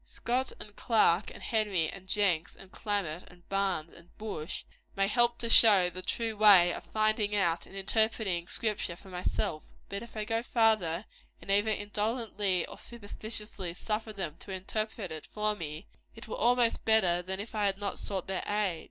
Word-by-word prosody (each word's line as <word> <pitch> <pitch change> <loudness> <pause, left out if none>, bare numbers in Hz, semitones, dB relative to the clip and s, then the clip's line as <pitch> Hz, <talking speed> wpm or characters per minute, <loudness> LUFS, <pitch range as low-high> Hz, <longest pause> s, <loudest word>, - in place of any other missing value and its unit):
Scott, 255 +2 -2
and 205 -1 -9
Clarke, 210 -5 +3
and - - -11
Henry, 205 -7 +1
and 190 +2 -8
Jenks, 190 -5 +1
and 190 -1 -14
Calmet, 190 -6 -2
and 175 -1 -18
Barnes, 190 -5 -1
and 170 +1 -17
Bush, 190 -7 -5 0.3
may 195 - +2
help 240 +2 +2
to 235 - -1
show 215 -4 +8
me 180 - +1
the 180 +1 -7
true 225 +4 -1
way 195 -5 +7
of - - -7
finding 215 -1 +1
out 170 -4 +1
and - - -14
interpreting 195 -3 +1
the - - -10
Scripture 210 -5 -1
for 190 +2 -15
myself; 180 -3 -2 0.2
but 200 +1 -4
if 235 -1 -11
I 215 - -2
go 225 +1 0
farther, 215 -7 +2 0.3
and 195 - -5
either 205 +2 +3
indolently 210 -2 -1
or - - -10
superstitiously 210 -5 -5
suffer 215 +3 -3
them 180 -7 -5
to - - -10
interpret 200 +1 -3
it 155 -1 -7
for 210 0 0
me, 155 -1 -6 0.3
it 225 - -10
were - - -4
almost 240 0 +3
better 185 -6 +4
that 190 +5 -5
I 210 -2 0
had 195 -1 0
not 200 0 -3
sought 190 -3 -3
their 190 -1 -3
aid. 205 -5 0
205 Hz, 185 wpm, -30 LUFS, 180-220 Hz, 0.3 s, show